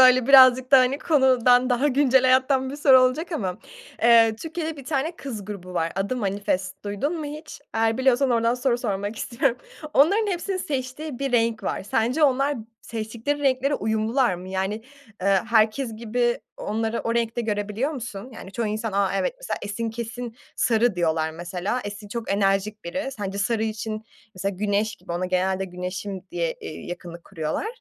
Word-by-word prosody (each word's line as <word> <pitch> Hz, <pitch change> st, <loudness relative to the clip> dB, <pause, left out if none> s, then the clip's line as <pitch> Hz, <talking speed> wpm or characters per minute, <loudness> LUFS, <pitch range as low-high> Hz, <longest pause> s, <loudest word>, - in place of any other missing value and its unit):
Böyle 255 Hz, -1 st, +7 dB
birazcık 260 Hz, -1 st, +7 dB
da 270 Hz, -, +10 dB
hani 255 Hz, +2 st, +2 dB
konudan 255 Hz, -5 st, +4 dB
daha 250 Hz, +4 st, +2 dB
güncel 265 Hz, -1 st, +4 dB
hayattan 260 Hz, +1 st, +3 dB
bir 285 Hz, -, -6 dB
soru 270 Hz, -3 st, +6 dB
olacak 290 Hz, +8 st, +1 dB
ama. 185 Hz, -, -2 dB, 0.4 s
Eee, 230 Hz, -1 st, +6 dB
Türkiye'de 320 Hz, +2 st, -5 dB
bir 275 Hz, -, -10 dB
tane 310 Hz, +4 st, -2 dB
kız 225 Hz, -8 st, -6 dB
grubu 185 Hz, -3 st, -8 dB
var. 165 Hz, -1 st, 0 dB
Adı 200 Hz, +6 st, -1 dB
"Manifest" 195 Hz, -3 st, -2 dB
duydun 275 Hz, -, -2 dB
mu 305 Hz, -, -4 dB
hiç? 300 Hz, 0 st, -8 dB
Eğer 225 Hz, +2 st, +1 dB
biliyorsan 260 Hz, 0 st, +3 dB
ordan 230 Hz, 0 st, +2 dB
soru 250 Hz, -1 st, 0 dB
sormak 205 Hz, -2 st, -3 dB
istiyorum. 240 Hz, +2 st, 0 dB, 0.4 s
Onların 395 Hz, +11 st, +4 dB
hepsinin 370 Hz, +2 st, -2 dB
seçtiği 275 Hz, -2 st, -4 dB
bir 275 Hz, -2 st, -2 dB
renk 230 Hz, -2 st, +2 dB
var. -, -, -2 dB
Sence 235 Hz, +9 st, 0 dB
onlar 275 Hz, 0 st, +3 dB, 0.3 s
seçtikleri 230 Hz, +5 st, -3 dB
renklere 270 Hz, +1 st, +2 dB
uyumlular 220 Hz, 0 st, +1 dB
mı? 180 Hz, +2 st, -9 dB
Yani, 190 Hz, +3 st, -2 dB, 0.4 s
ııı, 195 Hz, -1 st, +4 dB
herkes 225 Hz, +1 st, +2 dB
gibi 240 Hz, +1 st, 0 dB, 0.2 s
onları 225 Hz, +2 st, -2 dB
o 230 Hz, -, -2 dB
renkte 235 Hz, 0 st, 0 dB
görebiliyor 210 Hz, +4 st, -1 dB
musun? 235 Hz, -4 st, -7 dB
Yani 195 Hz, -, -10 dB
çoğu 230 Hz, +3 st, -2 dB
insan, 215 Hz, 0 st, -3 dB
a 200 Hz, -1 st, +2 dB
evet -, -, 0 dB
mesela -, -, -4 dB
Esin 225 Hz, +3 st, -3 dB
kesin 235 Hz, +1 st, -6 dB, 0.2 s
sarı 225 Hz, -3 st, +2 dB
diyorlar 160 Hz, -2 st, +1 dB
mesela. 175 Hz, +8 st, -3 dB
Esin 205 Hz, 0 st, -7 dB
çok 230 Hz, 0 st, -5 dB
enerjik 200 Hz, +1 st, 0 dB
biri. 270 Hz, -, -3 dB
Sence 200 Hz, -2 st, -4 dB
sarı 220 Hz, +2 st, 0 dB
için 215 Hz, 0 st, -4 dB, 0.3 s
mesela 195 Hz, +1 st, -3 dB
güneş 210 Hz, +1 st, 0 dB
gibi, 170 Hz, -, -8 dB
ona 180 Hz, +2 st, -1 dB
genelde 185 Hz, +1 st, 0 dB
güneşim 185 Hz, +1 st, -5 dB
diye, -, -, -1 dB
eee, -, -, -7 dB
yakınlık 175 Hz, -1 st, -8 dB
kuruyorlar. 155 Hz, -, -3 dB
230 Hz, 170 wpm, -24 LUFS, 200-265 Hz, 0.4 s, da